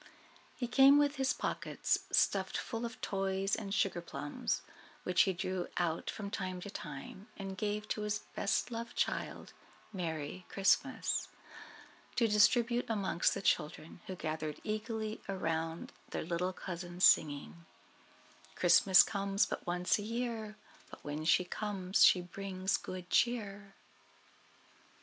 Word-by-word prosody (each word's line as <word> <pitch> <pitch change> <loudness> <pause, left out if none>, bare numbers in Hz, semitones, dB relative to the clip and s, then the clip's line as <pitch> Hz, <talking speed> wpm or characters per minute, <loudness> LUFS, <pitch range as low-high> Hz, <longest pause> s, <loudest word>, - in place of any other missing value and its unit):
He 245 - -3
came 275 +3 +7
with 290 0 +2
his 265 -1 +2
pockets - - -1
stuffed - - +2
full 230 0 -4
of 230 - -11
toys 195 0 0
and 200 -3 -6
sugarplums, 175 - -1 0.4
which 180 - +3
he - - +1
drew 185 0 -3
out 170 -2 -1
from 200 -2 -5
time 185 -3 -3
to 200 - -7
time, 150 +6 -8
and 195 -1 -5
gave 210 +2 -2
to 215 - -2
his 210 0 0 0.2
best 200 - 0
loved 230 0 -5
child, - - -2 0.4
Merry 165 -1 -4
Christmas, 195 0 +1 0.9
to 230 - +3
distribute 235 +3 +3
amongst 200 -5 +1
the 195 - -5
children, 155 +2 -1
who 185 - -4
gathered 155 -2 -4
eagerly 215 0 -3
around 165 -3 -2 0.2
their - - -3
little 170 +2 -1
cousin, 175 -1 -7
saying: 140 - +3 0.9
"Christmas 185 +1 +7
comes 200 -1 +1
but - - -6
once 180 +3 +1
a - - -3
year, 225 -1 -3 0.3
But - - -12
when 150 +2 -4
she 180 - +4
comes 195 -1 0
she 180 - +7
brings 190 +1 -2
good 185 -1 -6
cheer." 205 -4 0
195 Hz, 130 wpm, -33 LUFS, 175-215 Hz, 0.9 s, came